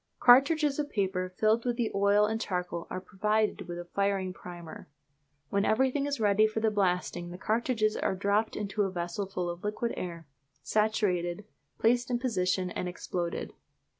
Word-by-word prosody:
Cartridges 280 +4 +5
of 290 -1 -1
paper 185 -3 -1
filled 220 +2 +3
with 245 -1 -1
the 235 -3 0
oil 200 +1 +4
and 220 +1 -2
charcoal 180 -4 -3
are - - -3
provided 210 +1 0
with 175 0 -5
a 175 - -6
firing 195 0 -1
primer. 175 -5 -10 0.6
When 200 0 +2
everything 265 +6 +2
is 285 -3 -2
ready 210 0 +4
for 215 +1 -3
the 220 0 +2
blasting 180 -3 0
the 175 - -8
cartridges 220 +1 0
are - - 0
dropped 200 +3 +1
into 210 0 -2
a 195 - +2
vessel 175 +2 -3
full 180 -2 -3
of 175 0 -5
liquid 215 +3 -2
air, 170 -2 -6 0.4
saturated, 205 -4 0 0.3
placed 240 +2 +2
in 245 - +1
position, 185 -7 0
and 180 - -3
exploded. 175 -1 -4
200 Hz, 165 wpm, -29 LUFS, 180-220 Hz, 0.6 s, Cartridges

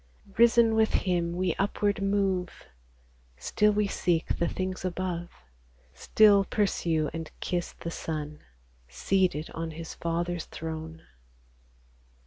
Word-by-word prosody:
Risen 235 0 +5
with 220 0 +2
Him, 170 -2 0
we 180 -2 0
upward 200 0 0
move; 195 -2 -1 0.7
Still 210 - +2
we 210 0 +1
seek 170 -4 0
the 170 - +2
things 185 +2 -3
above, 180 -1 -3 0.6
Still 200 - +5
pursue 170 -7 0
and 165 -1 -5
kiss 175 -1 -2
the 170 - -7
Son, 150 -2 -5 0.5
Seated 160 - 0
on 165 0 -4
His 160 +1 -7
Father's 170 0 -2
throne. 160 0 -7
175 Hz, 110 wpm, -28 LUFS, 165-195 Hz, 0.7 s, Risen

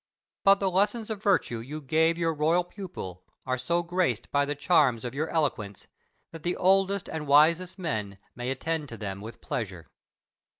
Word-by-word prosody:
But 195 0 +6
the 195 -1 +1
lessons 210 +4 +1
of 210 -2 -4
virtue 185 - +1
you 140 +7 -6
gave 160 +3 +2
your 165 -1 +1
royal 160 +4 +2
pupil 175 - -8 0.2
are 130 0 0
so 170 +8 0
graced 170 - -1
by 145 0 +3
the 145 +1 -3
charms 140 -7 +3
of 120 - -4
your 155 +4 -2
eloquence 115 - -2 0.5
that 165 - -9
the 175 +2 -1
oldest 195 +1 +3
and 155 -2 -5
wisest 165 +6 +4
men 110 - -3 0.2
may 120 +1 -4
attend 150 +2 -2
to 115 - -8
them 100 -2 -5
with 110 +3 -9
pleasure. 95 -8 -5
155 Hz, 175 wpm, -28 LUFS, 125-180 Hz, 0.5 s, But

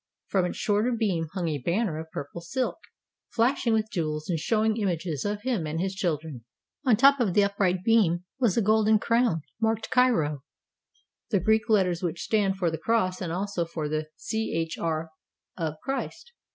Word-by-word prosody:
From 190 -3 +2
its 180 - -4
shorter 210 +4 +1
beam 195 -8 0
hung 180 -3 -1
a 150 -3 -1
banner 170 - 0
of 160 0 -8
purple 150 +3 -6
silk, 250 - -2 0.5
flashing 235 0 +1
with 220 -1 +1
jewels 155 -3 -2
and 165 - 0
showing 220 +4 +1
images 170 - -2
of 205 0 -2
him 235 -11 -1
and 155 +2 -3
his 190 +2 -1
children. 155 - -3 0.4
On 250 -6 +5
the 220 - -7
top 275 0 +7
of 210 -8 +1
the 205 - +6
upright 195 -2 0
beam 190 -7 +3 0.2
was 235 -7 +2
a 230 - +3
golden 215 +1 +4
crown 230 -6 +1 0.2
marked 225 -1 0
>^, 195 - +3 0.9
the 205 - +2
Greek 220 +4 +2
letters 185 -5 +2
which 175 -2 -3
stand 200 -3 +1
for 175 -3 0
the 160 - -4
cross 195 -5 0
and 175 -3 -3
also 185 0 -1
for 160 -2 -4
the 155 +1 -2
Ch 165 -7 -2
r 160 -1 -2 0.4
of 160 -3 -3
"Christ." 275 - -4
190 Hz, 180 wpm, -27 LUFS, 165-220 Hz, 0.9 s, top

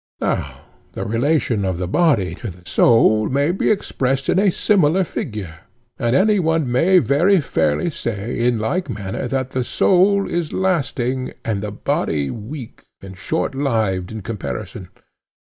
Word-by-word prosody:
Now - - -2 0.3
the - - -4
relation 115 -1 +1
of 95 -2 -1
the 90 0 -3
body 115 - +2
to 115 - -4
the 90 -1 -13
soul 110 -1 +4
may 140 +4 +1
be 190 - 0
expressed 135 -9 -1
in - - +3
a 200 0 +4
similar 185 -2 +2
figure; 105 - -6 0.4
and 120 +2 +1
any 205 +3 +4
one 160 -6 0
may 170 +10 +4
very 175 +5 +3
fairly 80 - 0
say 115 -4 -4
in 120 0 +2
like 140 +10 -2
manner 100 +1 -4
that 130 +1 -2
the 130 -1 -1
soul 195 +9 +3
is 170 -3 -2
lasting, 135 -8 -1
and 105 -3 -1
the 105 0 -4
body 75 -7 -1
weak 115 +3 -8 0.2
and 95 -1 -10
shortlived 110 - -1
in 110 -2 -7
comparison. 95 - -6
125 Hz, 150 wpm, -20 LUFS, 105-160 Hz, 0.4 s, soul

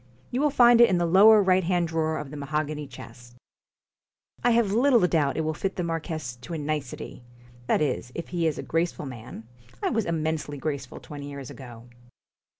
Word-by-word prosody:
You 250 - -1
will 300 - +3
find 240 -3 +6
it 235 - +7
in 185 - +2
the 175 - +1
lower 205 +5 +7
right 185 0 +3
hand 175 0 +1
drawer 160 -1 -1
of 140 -2 -6
the - - -7
mahogany 150 +1 -3
chest. 120 -1 -13 1.1
I 240 - +4
have 230 -4 +3
little 240 -1 +4
doubt 150 -5 +1
it - - +1
will 155 0 -1
fit 190 +5 -3
the 180 - -2
marquess 160 -6 -4
to 145 +8 -7
a - - -2
nicety 150 -5 -5 0.5
that 155 - +2
is, 125 -4 -2
if 170 - -6
he 170 -2 0
is 155 - -1
a - - -5
graceful 165 -2 -1
man 115 -3 -9 0.4
I - - +1
was 225 -2 0
immensely 160 -3 -2
graceful 140 -3 -5
twenty 145 -1 -8
years 140 -3 -8
ago.' 120 -3 -11
155 Hz, 195 wpm, -26 LUFS, 140-185 Hz, 1.1 s, it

